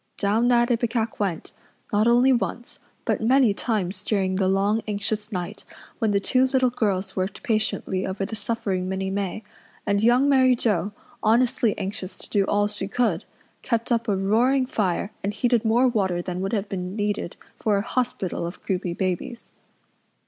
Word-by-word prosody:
Down 215 +4 +2
that 240 0 +4
ipecac 230 -1 -1
went, 190 -6 -2 0.4
not 210 +2 +3
only 245 +3 +5
once, 240 0 -3 0.3
but - - 0
many 245 -1 +4
times 200 -4 -2
during 190 -3 0
the 190 -1 +2
long, 200 +3 +2
anxious 210 +1 -2
night 180 -3 -5 0.4
when 225 -4 +1
the 200 -1 +2
two 255 +6 +3
little 260 -1 +2
girls 195 -5 -1
worked 190 +6 -3
patiently 215 -5 -1
over 195 +1 -2
the 220 - -5
suffering 200 -4 -2
Minnie 190 0 -2
May, 200 +2 -3 0.4
and 200 0 +1
Young 245 +5 +4
Mary 260 -2 +5
Joe, 205 -5 0 0.3
honestly 235 0 +2
anxious 195 -1 -4
to - - -9
do 200 -2 +2
all 205 +1 +2
she 210 -2 -3
could, 240 +4 0 0.4
kept 230 -1 -1
up 230 -1 +1
a 205 - +2
roaring 240 +7 +2
fire 200 -5 -1
and 205 +1 -2
heated 240 +1 +2
more 235 +3 +4
water 195 -7 0
than 180 0 -4
would 195 +3 -2
have 205 -2 -1
been 185 -1 -4
needed 205 -4 -2 0.2
for 210 -2 +2
a 200 - -1
hospital 230 -9 -2
of 175 - -9
croupy 180 -3 -2
babies. 185 +6 -3
210 Hz, 170 wpm, -24 LUFS, 195-235 Hz, 0.4 s, only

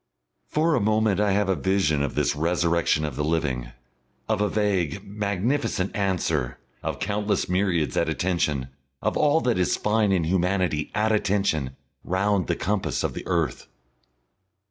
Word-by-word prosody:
For 160 +2 +1
a 150 - +3
moment 110 -1 +2
I 105 -2 +2
have 100 0 +1
a 95 - +2
vision 95 -7 +1
of 70 - -2
this - - +1
resurrection 85 -1 +1
of 75 -4 -4
the 75 - -1
living, 75 -6 -1 0.6
of 110 -2 0
a 105 - +2
vague, 100 -4 0
magnificent 100 +1 -1
answer, 85 -10 0 0.2
of - - -3
countless 105 +1 -1
myriads 90 -6 0
at 85 - +1
attention, 75 -4 0 0.3
of - - 0
all 150 +2 +3
that 120 -6 +1
is 90 - +1
fine 105 -1 +2
in 90 -3 +2
humanity 90 -2 0
at 110 +1 +2
attention, 95 -10 0 0.3
round 95 -1 +1
the - - +1
compass 105 +1 -1
of - - -1
the - - -7
earth. - - -1
95 Hz, 155 wpm, -25 LUFS, 80-105 Hz, 0.6 s, a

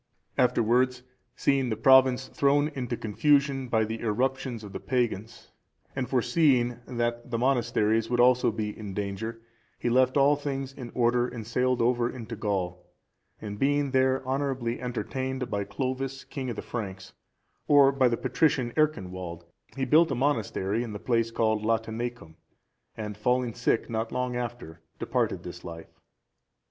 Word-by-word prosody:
Afterwards 125 +1 +2 0.3
seeing 135 -2 +1
the 110 - 0
province 130 +1 +5
thrown 145 +1 +2
into 125 -5 -4
confusion 140 +4 +2
by 110 -2 +2
the 110 +1 -4
irruptions 125 +1 -1
of 100 - -9
the - - -4
pagans,(389) 115 -4 -4
and 125 -2 -2
foreseeing 125 -1 +2
that 120 -1 -2
the 115 - -1
monasteries 115 -3 +1
would 120 0 0
also 125 -1 +5
be 105 -1 -4
in 100 -3 -7
danger, 105 +3 -4 0.3
he 120 - -1
left 130 +2 +3
all 140 +1 +5
things 135 -2 -4
in 125 -3 -8
order, 120 0 +2
and 120 -3 -7
sailed 125 +1 +1
over 120 0 +2
into 115 -2 -7
Gaul, 95 -5 -2 0.6
and 105 -1 -7
being 145 0 +1
there 130 0 +2
honourably 130 -3 -2
entertained 130 +1 -3
by 100 -1 -1
Clovis, 130 +1 -3
king 130 -2 -5
of 120 - -3
the - - -6
Franks,(390) 95 -5 -6 0.5
or 140 -2 +6
by 135 -2 +3
the 120 -1 0
patrician 130 -2 +1
Ercinwald, 95 - -1 0.3
he 135 -1 -1
built 160 +6 +5
a 135 - -1
monastery 115 -5 0
in 115 -3 -5
the - - -4
place 115 -1 +1
called 110 -2 0
Latineacum,(391) 115 -4 -2 0.6
and 105 -2 -5
falling 125 +2 0
sick 120 -1 0
not 110 0 -3
long 125 -1 -2
after, 120 -9 -5 0.2
departed - - -1
this - - -8
life. 80 0 -9
120 Hz, 155 wpm, -27 LUFS, 110-130 Hz, 0.6 s, or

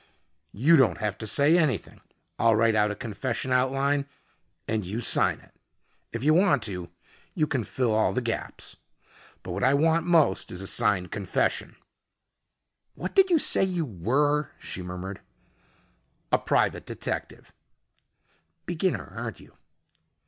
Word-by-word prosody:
"You 150 +11 +5
don't 130 -4 +3
have 105 -2 -2
to 110 - -6
say 145 +8 +3
anything. 140 - -1 0.4
I'll 115 -1 +4
write 115 +1 +3
out 105 -1 +3
a 105 - -3
confession 115 +4 -4
outline 135 +2 +1 0.6
and 110 -1 -1
you 100 +6 -4
sign 120 - +2
it. - - -22 0.6
If 115 +1 -5
you 155 +2 +4
want 170 - +3
to, 90 -5 -4 0.5
you 155 - +2
can 130 -5 -2
fill 120 +1 -1
all 110 0 +2
the - - -1
gaps. 115 -2 -4 0.7
But 90 - -6
what 95 +3 -3
I 135 +2 +4
want 165 +3 +2
most 160 - +3
is 90 - -6
a 95 - -6
signed 95 -2 +1
confession 100 -3 -1 0.6
" - - -55
"What - - -5
did 385 -1 +5
you 345 - +5
say 290 - +4
you 180 -4 -1
were?" 140 - 0
she 90 - -6
murmured. 90 +2 -7 1.1
"A - - +4
private - - 0
detective." - - -5 1.1
"Beginner, - - -2
aren't - - -5
you?" - - -17
120 Hz, 150 wpm, -26 LUFS, 105-150 Hz, 1.1 s, You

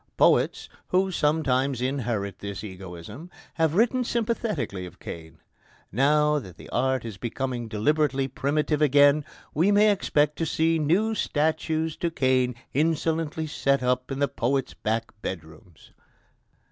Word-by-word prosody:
Poets, - - +3 0.2
who 190 +1 +2
sometimes 140 -5 +1
inherit 120 -7 -2
this 100 0 -6
egoism, 95 - -9 0.2
have 160 -1 +1
written 245 +4 +3
sympathetically 215 - -2
of 90 - -14
Cain: 80 -1 -9 0.5
now 150 +5 +3
that 95 -9 -12
art 130 0 0
is 110 -4 -6
becoming 120 0 -3
deliberately 135 +5 +1
primitive 150 +3 -1
again, 145 +1 +5 0.3
we 175 +7 +3
may 210 +1 +5
expect 150 -6 +1
to 165 - -1
see 160 +2 +1
new 185 +9 +2
statues 160 -2 0
to 170 - -1
Cain 130 -5 +1 0.2
insolently 160 +1 0
set 140 -3 0
up 125 0 0
in 135 - -2
the 140 0 +2
poets' 135 +1 -1
back 115 +1 -2
bedrooms. 85 +1 -8
140 Hz, 130 wpm, -26 LUFS, 120-160 Hz, 0.5 s, again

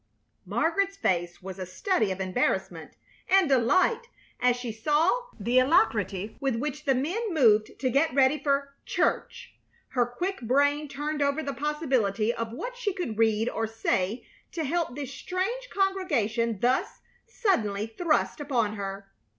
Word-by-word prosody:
Margaret's 335 - 0
face 175 - -1
was 190 0 -7
a 185 - -3
study 215 - 0
of 190 - -4
embarrassment 190 +6 -1 0.4
and 385 -2 +5
delight 370 - +3 0.3
as 250 -1 +3
she 245 -1 -5
saw 310 - +1
the 240 +5 +3
alacrity 210 - +1
with 270 -3 0
which 295 +4 -4
the 270 -2 +3
men 375 - -1
moved 220 -7 +4
to 260 - +1
get 285 +6 +2
ready 270 +3 +3
for 280 -1 0
"church." - - -1 0.4
Her 245 -2 +1
quick 355 +8 -4
brain 285 +5 +2
turned 295 +2 -3
over 285 +2 +1
the 280 - -3
possibility 260 -8 0
of 230 -1 -4
what - - -6
she 470 -6 -2
could 235 - -4
read 220 0 +3
or 225 -2 -1
say 220 -1 -1 0.3
to 325 - -2
help 315 -3 -1
this 280 -1 -5
strange 425 - -3
congregation 275 - 0
thus 260 - 0 0.3
suddenly 220 - 0
thrust 305 +10 0
upon 235 -8 0
her. 195 0 -5
270 Hz, 150 wpm, -27 LUFS, 225-330 Hz, 0.4 s, and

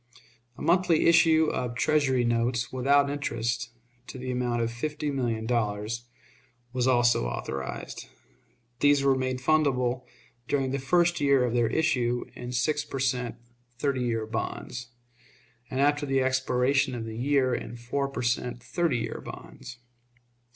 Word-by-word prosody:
A - - -7
monthly 170 0 +3
issue 160 -1 +5
of 125 -2 -3
Treasury 135 -3 +2
notes, 120 +1 0
without 140 +2 +3
interest, 120 -5 -2 0.4
to - - -8
the 130 0 -4
amount 120 -1 0
of 115 - -2
fifty 150 +5 -3
million 120 -5 -1
dollars, 115 0 -1 0.7
was 125 -1 +1
also 120 - +3
authorized. 65 +2 -5 0.7
These 145 -1 +4
were 135 -1 +5
made 130 0 -1
fundable 130 -4 +1 0.4
during 135 -1 0
the 140 - -1
first 175 +4 +2
year 140 -3 +4
of 120 - -1
their 120 -1 +3
issue 125 -3 +1
in 125 - -7
six 145 +4 0
per 135 - -6
cent. 125 -3 0 0.4
thirty 135 0 0
years 115 -2 -2
bonds, 120 +1 -4 0.8
and 130 - -3
after 145 +1 +2
the 135 -1 +2
expiration 130 0 +1
of 115 -2 -4
the 110 -1 -6
year 135 -1 +2
in 120 0 -4
four 135 +4 -2
per 125 -2 -4
cent. 120 0 -1
thirty 170 -7 0
years 115 - -4
bonds. 120 - -10
130 Hz, 145 wpm, -27 LUFS, 120-140 Hz, 0.8 s, issue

